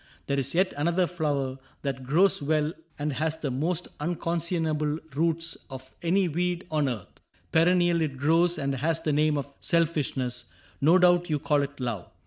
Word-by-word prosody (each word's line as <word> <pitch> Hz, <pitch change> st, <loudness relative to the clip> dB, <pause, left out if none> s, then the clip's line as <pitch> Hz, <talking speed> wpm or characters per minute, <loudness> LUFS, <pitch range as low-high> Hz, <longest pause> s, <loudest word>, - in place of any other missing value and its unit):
There 140 Hz, 0 st, 0 dB
's 135 Hz, +4 st, -4 dB
yet 185 Hz, +2 st, +3 dB
another 170 Hz, +5 st, +2 dB
flower 145 Hz, -6 st, -2 dB, 0.2 s
that 135 Hz, -2 st, -3 dB
grows 175 Hz, +7 st, +4 dB
well 155 Hz, +1 st, +1 dB, 0.2 s
And 150 Hz, 0 st, -2 dB
has 155 Hz, +4 st, -1 dB
the 150 Hz, -4 st, -3 dB
most 165 Hz, +7 st, -1 dB
unconscionable 165 Hz, -2 st, -1 dB, 0.2 s
roots 165 Hz, +1 st, 0 dB
Of 130 Hz, -1 st, -10 dB
any 180 Hz, +3 st, +2 dB
weed 175 Hz, +2 st, -1 dB
on 150 Hz, -3 st, +2 dB
earth. 110 Hz, -7 st, -7 dB, 0.3 s
Perennial 175 Hz, 0 st, +4 dB
It 145 Hz, -4 st, -2 dB
grows, 165 Hz, +5 st, +3 dB
and 140 Hz, -2 st, -1 dB
has 155 Hz, +5 st, 0 dB
the 155 Hz, -2 st, 0 dB
name 150 Hz, 0 st, +2 dB
of 140 Hz, -, -3 dB
Selfishness; 150 Hz, -7 st, 0 dB, 0.4 s
No 160 Hz, +6 st, +6 dB
doubt 175 Hz, -1 st, +4 dB
you 150 Hz, -, +2 dB
call 145 Hz, 0 st, +1 dB
it 140 Hz, 0 st, -5 dB
Love. 120 Hz, -7 st, -3 dB
155 Hz, 165 wpm, -27 LUFS, 140-170 Hz, 0.4 s, No